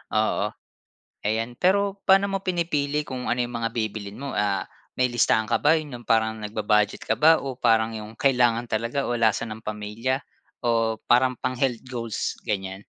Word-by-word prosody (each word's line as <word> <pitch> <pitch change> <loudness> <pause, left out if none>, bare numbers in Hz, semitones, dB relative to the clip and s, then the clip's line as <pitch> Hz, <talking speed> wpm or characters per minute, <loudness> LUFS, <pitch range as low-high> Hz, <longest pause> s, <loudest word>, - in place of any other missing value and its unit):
Oo, 110 0 +1 0.8
ayan. 115 +3 -1
Pero 200 +2 +2
paano 195 +1 +6
mo 195 - 0
pinipili 160 -6 0
kung 130 -3 -5
ano - - +1
yung 120 0 -4
mga 115 - 0
bibilhin 110 -3 -3
mo? 140 0 -5
Ah, 105 -1 0 0.3
may 125 0 +2
listahan 110 -2 +3
ka - - +2
ba, 150 +2 +5
yun 155 -3 -5
yung 120 - -18
parang 110 -1 +2
nag-bu-budget 105 0 0
ka - - +1
ba 160 +2 +7
o 135 - -3
parang 115 -2 +3
yung 110 0 -8
kailangan 120 -3 +3
talaga 115 +5 -1
o - - -1
lasa 115 0 +2
ng 110 -1 -7
pamilya, 110 +5 -3 0.4
o 115 -1 +2
parang 130 +1 +3
pang-health 125 -1 -1
goals, 120 -4 -4
ganiyan? 95 -1 -2
115 Hz, 170 wpm, -25 LUFS, 110-135 Hz, 0.8 s, ba